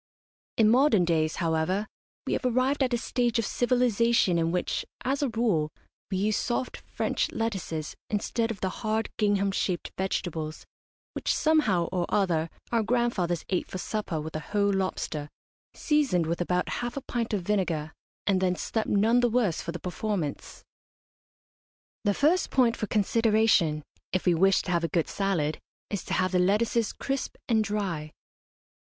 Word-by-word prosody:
In 220 - +5
modern 230 -5 +5
days, 155 -2 +1
however, 165 +4 0 0.4
we - - -1
have - - -1
arrived 255 +3 +1
at 260 -1 +2
a 240 - +2
stage 240 0 0
of 230 - +1
civilisation 235 -7 +2
in 165 0 +1
which, 180 0 -1 0.2
as 270 +3 0
a 280 - +1
rule, 220 -10 +1 0.4
we 190 - -1
use 210 +2 +1
soft 250 +1 -2
French - - -2
lettuces 190 -9 -3
instead 225 +2 -1
of 220 -4 -5
the 190 - 0
hard 220 0 -1
gingham 200 -2 +2
shaped 185 -2 -2
vegetables 160 -5 -3 0.5
which - - -1
somehow 300 - +3
or 180 -2 -1
other 170 -5 +1 0.2
our 230 -1 +3
grandfathers 215 -8 0
ate 185 - 0
for - - -6
supper 185 -4 -3
with 155 +1 -6
a - - -1
whole 200 +4 0
lobster, 165 -6 -2 0.5
seasoned 280 - +2
with 170 +2 -2
about 180 +1 0
half 240 +2 -4
a - - -2
pint 235 -3 -3
of 205 -4 -1
vinegar, 170 -6 -1 0.3
and 190 -2 +2
then 180 -1 +2
slept 220 +4 -2
none 220 +4 +4
the 245 -1 +3
worse 220 -8 +1
for 170 - -4
the 175 - -5
performance. 180 -4 -4 1.4
The 205 -1 +2
first 330 +5 +3
point 245 -3 +3
for 215 - -3
consideration, 215 -7 +3 0.3
if 185 - -1
we 180 - +5
wish 190 +3 +3
to 180 - -3
have 170 -1 +1
a - - +2
good 165 -2 0
salad, 175 -7 -1 0.3
is 200 -4 -2
to - - -3
have 185 0 +1
the 180 - +2
lettuces 210 +4 +2
crisp 275 0 -3
and 220 -3 +3
dry. 190 -8 -3
200 Hz, 165 wpm, -27 LUFS, 175-230 Hz, 1.4 s, In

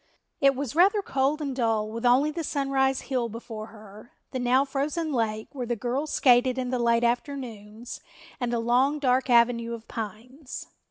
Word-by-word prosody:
It 275 0 +4
was 270 -1 -4
rather 395 +4 +4
cold 275 +2 0
and 275 -3 -3
dull 225 -4 +1
with 230 +2 -1
only 270 +5 +4
the 330 +1 -4
Sunrise 270 -2 0
Hill 250 -4 -2
before 220 -1 -7
her, 215 0 -14 0.2
the 260 - -3
now 250 +2 +3
frozen 295 +3 -2
lake, 220 -3 -1
where 255 -4 -5
the 240 - 0
girls 255 +7 -2
skated 250 0 +4
in 255 -1 -2
the 250 - 0
late 235 0 +2
afternoons, 235 -3 -3 0.4
and 245 -2 -1
the 240 - 0
long, 250 +5 +2
dark 260 -2 +1
avenue 235 -1 +3
of 230 -1 -13
pines. 235 +6 -7
250 Hz, 175 wpm, -26 LUFS, 230-275 Hz, 0.4 s, It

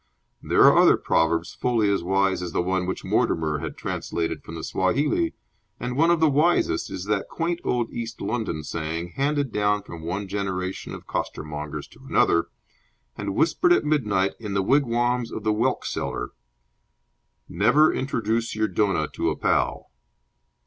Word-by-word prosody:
There - - +3
are - - +7
other - - +6
proverbs 85 +1 +1
fully 115 -4 +1
as 100 - +1
wise 95 +1 +1
as 90 -2 -5
the - - +1
one 95 0 -1
which 95 - -3
Mortimer 75 -2 0
had - - -6
translated 85 -1 -3
from 80 - -9
the 80 - -6
Swahili, 145 - 0 0.4
and 125 0 -3
one 165 +5 +4
of 170 -1 +3
the 160 - +5
wisest 155 +5 +2
is 90 - -5
that 105 -1 -1
quaint 170 +1 -2
old 120 -2 -1
East 115 0 -5
London 105 -7 -2
saying, 85 +2 -4
handed 140 - -1
down 105 -1 +1
from 85 -5 -9
one 95 +5 -3
generation 95 -1 -3
of - - -11
costermongers 75 -1 -5
to - - -18
another, 85 - +3 0.7
and 100 -2 -4
whispered 165 - +2
at 355 - +4
midnight 105 -11 +1
in 105 -3 -5
the 95 - +2
wigwams 120 -1 +1
of 110 - -5
the 110 -1 +2
whelk 110 - 0
seller! 60 - -3 1.2
"Never 135 +10 +4
introduce 115 -4 -1
your 110 0 +1
donah 95 -5 +1
to - - 0
a - - -1
pal." - - 0
105 Hz, 165 wpm, -24 LUFS, 90-125 Hz, 1.2 s, are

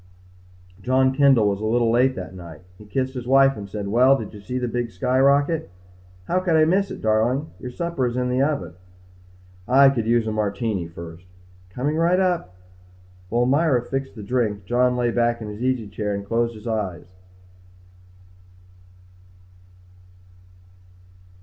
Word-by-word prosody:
John 130 +3 +2
Kendall 135 -6 +4
was 100 0 -1
a - - -3
little 115 0 +2
late 130 +3 +3
that 95 -3 -7
night. 85 -3 -11 0.2
He 105 - -13
kissed 130 +3 -2
his 125 -2 -6
wife 135 +1 +5
and 100 -2 -8
said, 100 0 -5
"Well, 125 +6 +4
did 110 -4 -7
you 105 - -11
see 125 +5 -5
the 125 -1 -2
big 120 0 -2
sky 125 +7 -1
rocket?" 140 +4 +2 0.6
"How 180 - +1
could 180 -3 0
I 155 0 +5
miss 195 +4 +1
it, - - -8
darling? 115 +7 +1
Your 125 - -6
supper 170 -1 -2
is 120 +1 -4
in 125 0 0
the 125 +1 +1
oven." 140 - -1 0.9
"I 135 +2 +6
could 115 -5 -2
use 120 -1 +2
a 110 - -2
Martini 105 -3 -2
first." 85 +1 -11 0.4
"Coming 140 +11 -2
right 170 +3 +2
up." 175 - -1 0.7
While 120 +3 +1
Myra 135 -2 +2
fixed 135 +1 -4
the 105 - -8
drink 105 -3 -1
John 125 +3 +1
lay 120 -1 +1
back 120 0 +1
in 110 -2 -7
his 105 +2 -8
easy 125 -4 -1
chair 105 +1 -3
and 100 0 -6
closed 115 +2 -1
his 110 - -13
eyes. 105 -6 -3
120 Hz, 165 wpm, -22 LUFS, 105-135 Hz, 0.9 s, I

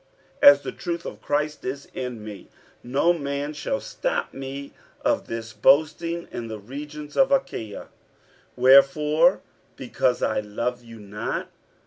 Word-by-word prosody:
47:011:010 - - +11
As 140 0 0
the - - -4
truth 170 0 -5
of - - -7
Christ 150 +1 -1
is 135 +2 -5
in 125 -4 -5
me, 105 -2 -9 0.3
no 140 +8 +2
man 140 -1 -3
shall 270 - -2
stop - - -3
me 135 +1 -7 0.3
of - - 0
this 115 0 -6
boasting 165 +3 +2
in 115 - -5
the 110 -1 -6
regions 145 +7 -8
of 270 0 +4
Achaia. 115 - -1
47:011:011 - - -14 0.7
Wherefore? 150 +6 +5 0.3
because 125 0 0
I - - +1
love 120 +4 -3
you 115 -1 -12
not? 105 0 -5
140 Hz, 145 wpm, -24 LUFS, 120-150 Hz, 0.7 s, 47:011:010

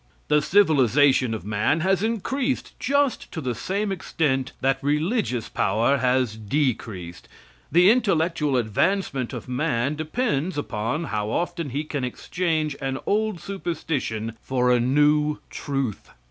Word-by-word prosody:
The 150 0 +4
civilization 140 - +4
of 110 - -8
man 110 +9 +1
has 190 +1 +2
increased 245 +5 -1
just 280 -1 0
to - - -4
the 130 -5 -2
same 195 - -2
extent 145 -7 -1
that 135 +1 +1
religious 150 - 0
power 115 +8 +1
has 125 -3 +1
decreased. 105 - -2 0.4
The 180 +4 +6
intellectual 165 - +1
advancement 130 - 0
of - - -7
man 130 0 0
depends 155 - -1
upon 120 +2 -2
how 105 -7 -2
often 170 +3 -2
he 140 +4 -2
can 145 -3 -4
exchange 155 +3 -1
an 135 0 -2
old 215 -3 0
superstition 155 - -3
for 125 -1 +1
a 125 - +4
new 150 +4 +3
truth. 135 -7 -3
145 Hz, 130 wpm, -24 LUFS, 125-175 Hz, 0.4 s, The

